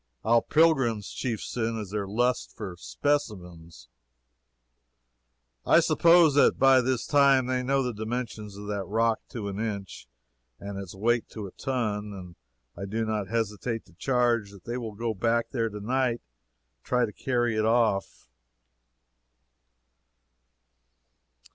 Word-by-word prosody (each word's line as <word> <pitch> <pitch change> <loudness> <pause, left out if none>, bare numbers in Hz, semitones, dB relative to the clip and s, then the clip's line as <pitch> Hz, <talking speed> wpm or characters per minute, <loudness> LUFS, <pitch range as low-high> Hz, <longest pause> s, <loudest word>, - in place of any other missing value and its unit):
Our 115 +1 +4
pilgrims' 135 -10 +2
chief 120 -5 -3
sin 115 -1 -2
is 100 -3 -7
their 105 -2 -2
lust 120 +5 -1
for 100 -6 -6
"specimens." 90 - -3 1.8
I - - +5
suppose 170 -3 +5
that 145 - +4
by 135 -1 +6
this 125 -1 -1
time 140 -3 +4
they 130 0 0
know 135 +1 +1
the 125 -1 -2
dimensions 110 -2 -5
of 105 - -8
that 100 -1 -3
rock 115 +3 +1
to 110 -4 -5
an 100 0 -5
inch, 100 - -5 0.5
and 100 0 -6
its 95 -2 -8
weight 115 +4 0
to 110 -2 -7
a 95 - -8
ton; 105 -5 -3
and 90 -3 -10 0.4
I 100 - -6
do 110 +3 -2
not 105 -3 -2
hesitate 115 +1 -2
to 90 - -21
charge 120 0 +1
that 100 -2 -15
they 120 - -4
will 110 -3 -6
go 115 +1 -2
back 115 +3 0
there 115 -4 -1
to 105 0 -7
night 120 +2 -1 0.5
and - - -50
try 125 -1 +1
to 105 - -8
carry 120 -3 0
it 110 0 +1
off. 110 -4 +1
115 Hz, 145 wpm, -27 LUFS, 100-125 Hz, 1.8 s, by